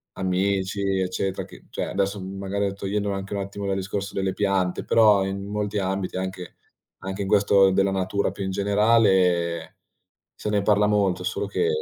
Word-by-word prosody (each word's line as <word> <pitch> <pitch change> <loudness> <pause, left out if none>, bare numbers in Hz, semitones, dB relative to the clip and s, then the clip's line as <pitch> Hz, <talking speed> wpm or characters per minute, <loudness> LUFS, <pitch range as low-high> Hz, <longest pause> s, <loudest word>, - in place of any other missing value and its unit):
amici 95 +1 0 0.2
eccetera, 95 +1 -2
che - - -15
cioè - - -2
adesso 100 +1 -1
m 95 +1 -7
magari 100 0 -1
togliendo 100 +1 -2
anche 100 0 -4
un 100 - -2
attimo 100 +1 -6
dal 95 - 0
discorso 100 +1 -4
delle 95 -1 -1
piante, 95 -3 0
però 105 -4 +5
in 100 0 -4
molti 105 0 -2
ambiti, 95 -1 -2
anche 95 -1 -5 0.4
anche 95 +1 -4
in - - -4
questo 100 -1 +4
della 95 +1 +2
natura 95 +1 0
più 100 - -5
in 95 - -2
generale, 95 -5 +2 0.6
se 105 - -4
ne 105 -1 +1
parla 105 0 +3
molto, 100 -3 +1
solo 90 - -2
che 435 - 0
100 Hz, 175 wpm, -24 LUFS, 95-100 Hz, 0.6 s, però